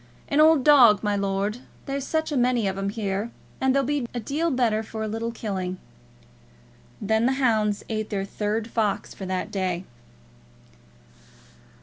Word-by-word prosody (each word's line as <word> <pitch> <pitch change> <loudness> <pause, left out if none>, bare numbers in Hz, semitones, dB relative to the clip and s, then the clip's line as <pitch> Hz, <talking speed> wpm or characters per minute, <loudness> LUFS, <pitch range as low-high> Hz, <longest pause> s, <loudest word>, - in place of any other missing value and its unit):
"An 285 - +2
old 310 -3 +6
dog, 245 -9 +7
my 205 -1 +1
lord. 200 +3 -1 0.3
There's 275 -1 -3
such 315 0 -1
a - - -1
many 245 -4 +2
of 190 - -1
'em 195 0 -2
here, 205 0 -2 0.3
that 265 0 +2
they'll 275 +1 +2
be 280 -2 -1
a - - -1
deal 295 +9 -1
better 240 -6 +1
for 220 0 -6
a - - -2
little 225 +2 -3
killing." 190 -5 -4 1.2
Then 220 +3 +1
the 265 - +2
hounds 220 -6 +1
ate 215 -1 -3
their 195 -2 -2
third 210 +2 -2
fox 220 -3 -1
for 190 - -7
that 185 0 -3
day. 185 -2 -2
220 Hz, 160 wpm, -25 LUFS, 200-255 Hz, 1.2 s, dog